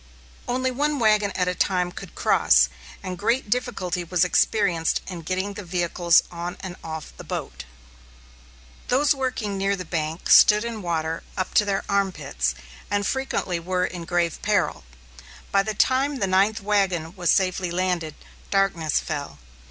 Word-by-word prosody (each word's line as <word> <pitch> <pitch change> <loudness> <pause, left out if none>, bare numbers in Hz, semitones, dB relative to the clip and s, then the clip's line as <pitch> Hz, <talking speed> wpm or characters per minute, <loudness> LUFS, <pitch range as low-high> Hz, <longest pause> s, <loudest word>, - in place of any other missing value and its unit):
Only 255 +1 0
one 295 +3 0
wagon 215 -4 +3
at 180 -1 0
a 180 - +1
time 180 0 0
could - - -10
cross, 65 +1 +4 0.3
and 180 -1 -5
great 230 0 0
difficulty 195 -8 -1
was 180 +1 +1
experienced 175 -3 +2
in 180 -3 -7
getting 185 +4 -2
the 205 0 -7
vehicles 175 -1 +2
on 175 0 -5
and 185 -2 -6
off 160 -1 -7
the - - -9
boat. - - -6 1.2
Those 285 +3 +3
working 245 -7 -3
near 195 +1 +1
the 180 -2 -7
bank 160 0 -3
stood 210 +1 +7
in 230 -2 -5
water 165 -2 -2 0.2
up 185 - -2
to 210 - +4
their 195 -1 -1
arm 200 -1 +1
pits, - - -2 0.3
and 205 0 0
frequently 265 -9 -1
were 180 +2 -1
in 175 -2 -6
grave 170 -1 0
peril. - - 0 0.7
By 195 - +4
the 215 +1 -3
time 270 +6 +2
the 245 - 0
ninth 195 +3 +2
wagon 190 -5 0
was 175 -3 -1
safely 185 -2 +2
landed, 175 -3 -1 0.3
darkness 180 -6 +1
fell. 140 - -5
185 Hz, 160 wpm, -24 LUFS, 175-210 Hz, 1.2 s, stood